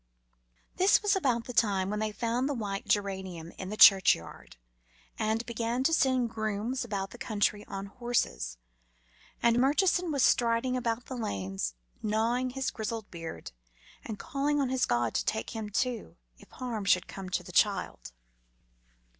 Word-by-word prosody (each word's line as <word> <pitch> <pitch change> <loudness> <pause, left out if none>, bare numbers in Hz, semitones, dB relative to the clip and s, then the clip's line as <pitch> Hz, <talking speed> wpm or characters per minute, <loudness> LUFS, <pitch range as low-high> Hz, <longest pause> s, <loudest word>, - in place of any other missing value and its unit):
This 385 +3 +4
was 415 -1 +3
about 255 -11 +1
the 250 - -6
time 200 -4 +2
when 210 - -2
they 215 0 -1
found 235 +5 -1
the 285 - -1
white 200 -4 -4
geranium 190 -5 -2
in 185 - -5
the 215 - -5
churchyard, 185 - +5 0.6
and 220 +1 0
began 235 +1 -2
to 325 - +2
send 255 -6 +2
grooms 220 +3 -2
about 200 -4 -4
the 240 - -12
country 210 -1 0
on 195 0 -5
horses. 200 - -2 0.9
And 235 0 +4
Murchison 340 +6 +2
was 280 -3 +1
striding 235 +2 +3
about 235 -1 -2
the 260 - -6
lanes 95 - -3 0.3
gnawing 230 +4 0
his 265 +1 -2
grizzled 220 -1 -5
beard 165 - -7 0.5
and 220 - -6
calling 285 +6 -1
on 270 -2 +1
his 260 -1 +1
God 120 -2 +1
to - - 0
take 110 - -2
him, 220 -2 -5
too, 235 - -2 0.2
if - - -17
harm 235 -5 -5
had 185 -2 +3
come 190 -1 -7
to - - -1
the - - -10
child. - - +1
225 Hz, 160 wpm, -29 LUFS, 195-250 Hz, 0.9 s, churchyard